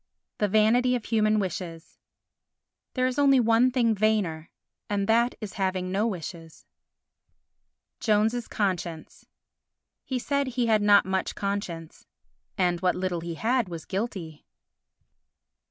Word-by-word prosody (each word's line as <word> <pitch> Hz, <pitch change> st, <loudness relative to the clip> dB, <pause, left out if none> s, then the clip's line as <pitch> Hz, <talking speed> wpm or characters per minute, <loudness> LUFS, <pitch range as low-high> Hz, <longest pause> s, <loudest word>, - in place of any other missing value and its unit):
The 210 Hz, -, +2 dB
Vanity 225 Hz, +5 st, +3 dB
of 240 Hz, -, -4 dB
Human 215 Hz, -1 st, +2 dB
Wishes 175 Hz, -4 st, -5 dB, 1.0 s
There 255 Hz, -1 st, +1 dB
is 255 Hz, +2 st, -1 dB
only 275 Hz, -2 st, +5 dB
one 230 Hz, +2 st, +4 dB
thing 240 Hz, -3 st, +2 dB
vainer 200 Hz, -7 st, 0 dB, 0.4 s
and 200 Hz, -1 st, 0 dB
that 235 Hz, +2 st, +3 dB
is 215 Hz, -3 st, -6 dB
the -, -, -13 dB
having 185 Hz, -1 st, -1 dB
no 205 Hz, +4 st, +1 dB
wishes. 165 Hz, -4 st, -7 dB, 1.3 s
Jones's 220 Hz, +2 st, +1 dB
Conscience 175 Hz, -5 st, -3 dB, 0.8 s
He 260 Hz, -, -3 dB
said 280 Hz, +2 st, -1 dB
he 250 Hz, -1 st, -1 dB
had 220 Hz, -2 st, +3 dB
not 205 Hz, -1 st, +5 dB
much 190 Hz, 0 st, -2 dB
conscience, 195 Hz, -5 st, -5 dB, 0.5 s
and 175 Hz, -3 st, +1 dB
what 185 Hz, -1 st, +2 dB
little 180 Hz, -2 st, -2 dB
he 170 Hz, 0 st, -5 dB
had 235 Hz, +2 st, 0 dB
was 165 Hz, -2 st, -7 dB
guilty. 190 Hz, -7 st, -5 dB
205 Hz, 130 wpm, -26 LUFS, 180-230 Hz, 1.3 s, only